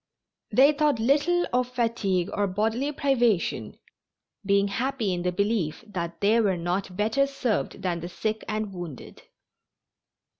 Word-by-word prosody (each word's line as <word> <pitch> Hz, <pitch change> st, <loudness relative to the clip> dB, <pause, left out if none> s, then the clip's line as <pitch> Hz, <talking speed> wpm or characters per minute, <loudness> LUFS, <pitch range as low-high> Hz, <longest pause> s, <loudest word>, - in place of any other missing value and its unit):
They 275 Hz, +3 st, +6 dB
thought 300 Hz, -2 st, +2 dB
little 295 Hz, +9 st, +2 dB
of 250 Hz, 0 st, +2 dB
fatigue 230 Hz, -7 st, 0 dB
or 205 Hz, -1 st, +1 dB
bodily 220 Hz, +9 st, 0 dB
privation, 245 Hz, -, 0 dB, 0.7 s
being 200 Hz, 0 st, +3 dB
happy 235 Hz, -2 st, -1 dB
in 175 Hz, -, -2 dB
the 180 Hz, 0 st, 0 dB
belief 200 Hz, -3 st, -1 dB
that 170 Hz, -5 st, -5 dB
they 215 Hz, +3 st, +4 dB
were 195 Hz, -4 st, +1 dB
not 180 Hz, +2 st, -3 dB
better 225 Hz, +7 st, +2 dB
served 250 Hz, -7 st, -2 dB
than 175 Hz, -2 st, -1 dB
the 175 Hz, +1 st, -6 dB
sick 215 Hz, +5 st, -3 dB
and 215 Hz, -2 st, -3 dB
wounded. 175 Hz, -7 st, -8 dB
215 Hz, 140 wpm, -26 LUFS, 185-250 Hz, 0.7 s, They